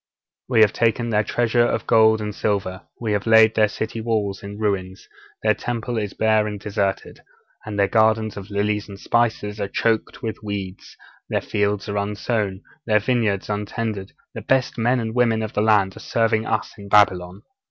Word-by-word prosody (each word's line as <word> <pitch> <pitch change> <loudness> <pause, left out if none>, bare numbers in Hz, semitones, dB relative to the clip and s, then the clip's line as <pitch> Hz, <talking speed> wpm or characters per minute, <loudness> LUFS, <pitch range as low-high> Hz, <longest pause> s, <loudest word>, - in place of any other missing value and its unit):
'We 120 -4 +4
have 105 -2 +5
taken 115 0 +1
their 105 0 +2
treasure 120 +2 +1
of 120 - -1
gold 110 -1 +4
and 105 0 -4
silver; 100 -2 -2 0.2
we 115 -3 -2
have 105 +1 -1
laid 110 0 +6
their 110 -1 +4
city 110 +2 -4
wall 110 -3 -1
in 100 0 -8
ruins; 95 -3 -3 0.4
their 110 0 +4
Temple 120 +1 -3
is 105 -2 -4
bare 110 -1 +2
and 105 -1 -5
deserted; 100 -1 -2 0.5
their 100 -1 +2
gardens 110 0 +2
of 100 0 -8
lilies 105 +1 -1
and 100 -1 -10
spices 110 -3 0
are 100 - -1
choked 110 +2 -1
with 110 -1 -4
weeds; 100 -3 -6 0.3
their - - +1
fields 105 0 -1
are 100 0 -3
unsown; 105 -1 -2 0.2
their 105 -1 +4
vineyards 110 -3 0
untended; 105 -1 -4 0.2
the - - -6
best 130 -2 +1
men 120 +2 +1
and 110 -1 -3
women 115 -2 +2
of 110 - -5
the 105 - 0
land 105 -3 +3
are - - -10
serving 115 -1 0
us 110 - -2
in 100 0 -10
Babylon. 95 -2 +3
105 Hz, 180 wpm, -22 LUFS, 100-110 Hz, 0.5 s, laid